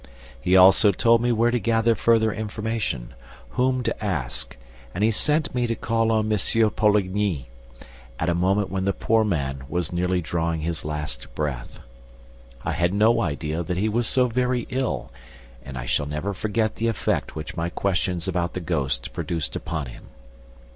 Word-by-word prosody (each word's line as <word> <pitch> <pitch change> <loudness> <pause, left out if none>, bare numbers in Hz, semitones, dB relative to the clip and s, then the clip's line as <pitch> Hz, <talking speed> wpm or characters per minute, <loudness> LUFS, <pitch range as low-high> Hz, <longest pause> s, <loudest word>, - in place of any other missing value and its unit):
He 90 +7 +4
also 95 +3 +7
told 115 +4 +3
me 120 0 +2
where 115 +1 +3
to 120 - +1
gather 115 +2 +2
further 110 0 +3
information, 110 - -3 0.4
whom 130 - +1
to 110 - -3
ask; 75 - -3 0.4
and 100 - 0
he 110 - +4
sent 150 +7 +1
me 125 -1 0
to 115 - -1
call 115 0 0
on 110 -1 +2
M. 105 - +1 0.3
Poligny, 100 - +1 0.7
at 80 - -1
a 85 - +2
moment 95 +3 +1
when 95 0 -1
the 100 - +2
poor 110 +4 +2
man 70 -9 -1
was 90 0 -2
nearly 90 +1 +1
drawing 85 -1 -1
his 80 0 -3
last 75 0 -4
breath. 70 -5 -4 0.8
I - - 0
had 85 +2 0
no 115 +3 +4
idea 75 - -2
that 85 +1 -3
he 105 +4 +1
was 115 +2 +1
so 130 -1 +4
very 125 0 0
ill, 130 -1 -2 0.5
and 65 0 -8
I - - -4
shall 70 - 0
never 75 +7 -3
forget 110 +2 -1
the 115 - 0
effect 115 -4 -1
which 75 -1 -6
my 85 0 -1
questions 90 -1 -1
about 90 -2 -1
the - - -1
ghost 70 -8 -2
produced 80 -4 -3
upon 80 -4 -3
him. - - -11
95 Hz, 175 wpm, -24 LUFS, 80-115 Hz, 0.8 s, also